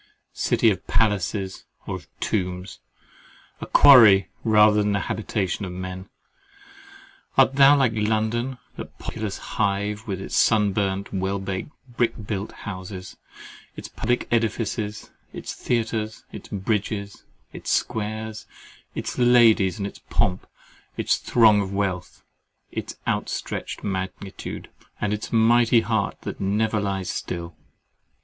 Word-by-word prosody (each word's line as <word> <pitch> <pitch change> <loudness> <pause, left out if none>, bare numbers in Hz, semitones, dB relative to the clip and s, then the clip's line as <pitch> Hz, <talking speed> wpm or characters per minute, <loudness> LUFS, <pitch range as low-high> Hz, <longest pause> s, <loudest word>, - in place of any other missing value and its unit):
City 115 - +2
of 95 -2 -5
palaces, 100 -3 0 0.2
or - - -4
of - - -15
tombs—a 90 -1 -6
quarry, 110 -9 +8
rather 105 -1 +5
than 105 0 +1
the 100 - 0
habitation 105 -2 -2
of 95 - -4
men! 95 +1 -6 1.3
Art 135 0 +5
thou 140 +1 +7
like 135 -4 +3
London, 110 +4 0 0.2
that - - -9
populous 110 -3 -4
hive, 105 +1 -2
with 95 -3 -3
its 95 - -5
sunburnt, 100 -2 +2
well 95 +1 -1
baked, 95 +2 -4 0.2
brick 120 -1 0
built 100 -1 -3
houses—its 95 -1 -10
public 120 +2 -1
edifices, 110 -2 -1 0.2
its - - -6
theatres, 110 -2 -2
its - - -10
bridges, 100 0 -2 0.3
its - - -7
squares, 110 -1 -2 0.5
its - - -4
ladies, 115 -6 +5
and 100 - -3
its 100 - -7
pomp, 90 0 0 0.5
its - - +1
throng 110 -4 +4
of 95 -1 -4
wealth, 95 -4 -3 0.5
its - - -5
outstretched - - -3
magnitude, 95 0 -5 0.3
and 105 0 0
its 105 - -5
mighty 115 +1 +4
heart 110 -2 -1
that - - -6
never 105 +2 +1
lies 95 -2 -2
still? 85 -2 -5
105 Hz, 120 wpm, -24 LUFS, 95-110 Hz, 1.3 s, quarry